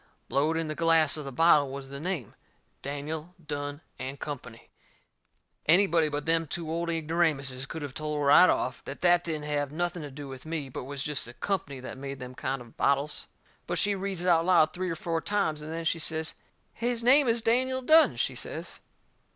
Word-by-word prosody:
Blowed 155 +4 +1
in 165 -1 -1
the 155 - -2
glass 165 -2 +3
of 150 -2 -4
the 135 - -5
bottle 150 0 +5
was 135 0 -7
the 140 0 -7
name: 165 - -3 0.5
"Daniel, 150 +5 -5
Dunne 145 0 -4 0.2
and 135 +2 -5
Company." 125 -6 -7 1.0
Anybody 165 -2 +4
but 145 -1 -3
them 165 0 +2
two 160 +1 -3
old 170 +1 -1
ignoramuses 155 -5 0
could 160 +1 -6
of 140 -3 -6
told 150 -1 -2
right 160 +6 +8
off 125 - -1
that 135 - -7
that 175 -1 +4
didn't 155 -3 -3
have 145 -2 -1
nothing 175 +2 -2
to 145 - -6
do 140 +1 -8
with 130 -1 -9
me, 155 -4 -4
but 125 - -6
was 140 0 -4
jest 150 -1 -1
the 120 +1 -11
company 145 -2 -2
that 130 - -8
made 140 0 -5
them 125 -1 -8
kind 130 0 -3
of 115 - -18
bottles. 140 +2 +1 0.4
But - - -1
she 205 -1 +3
reads 195 -2 -3
it 180 - -2
out 165 -2 +5
loud 170 -4 +5
three 185 0 -2
or 165 - -2
four 165 0 -2
times, 195 -7 0
and 155 +1 -7
then 165 0 -4
she 165 +1 +1
says: 160 0 -2 0.4
"His 235 0 -2
name 270 +3 +6
is 230 -1 +1
Daniel 260 +3 +1
Dunne," 315 +4 +6
she - - 0
says. - - -4
155 Hz, 205 wpm, -28 LUFS, 140-175 Hz, 1.0 s, right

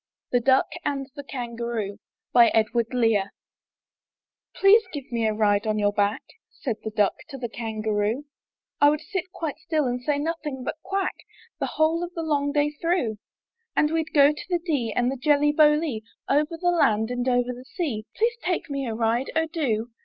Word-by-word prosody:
'' - - -67
THE 245 - +4
DUCK 265 +2 +4 0.2
AND 275 -1 -3
THE 285 - -7
KANGAROO 235 -5 -4 0.3
"Please 230 -2 +3 1.6
give 290 -3 -5
me 230 -2 +1
a 215 - +1
ride 210 -1 +2
on 215 0 +1
your 205 -1 +2
back," 205 +1 +1 0.3
Said 235 -6 -4
the - - -3
duck 210 -2 +1
to 275 - -7
the 245 -2 -3
kangaroo: 220 +2 -2 0.6
''I 290 - +8
would 300 +1 0
sit 365 +1 -4
quite 320 -6 -4
still 310 -3 0
and 245 0 -1
say 290 +3 0
nothing 295 -3 -3
but 315 - -5
'Quack'! 390 -1 -1 0.4
The - - -1
whole 320 +2 +2
of 350 0 -7
the 330 - -3
long 285 -2 0
day 295 0 +2
through; 300 - -1 0.6
And 300 0 +3
we'd 325 0 -1
go 285 -1 +6
to 300 - -8
the 355 - +2
Dee, 295 -10 -1
and 245 +3 +1
the 270 - -4
Jelly 295 +2 +3
Bo 300 0 +6
Lee, 300 -8 -2 0.2
Over 300 +4 +1
the 355 +1 +2
land 220 -9 +2
and 245 +1 -1
over 245 0 +1
the 250 +1 -11
sea: 245 - -2
Please 460 +2 +2
take 355 -4 -2
me 275 -2 -2
a 225 - -3
ride! 230 +3 0
Oh, 320 0 +3
do!" 245 -8 -2
265 Hz, 185 wpm, -25 LUFS, 225-310 Hz, 1.6 s, I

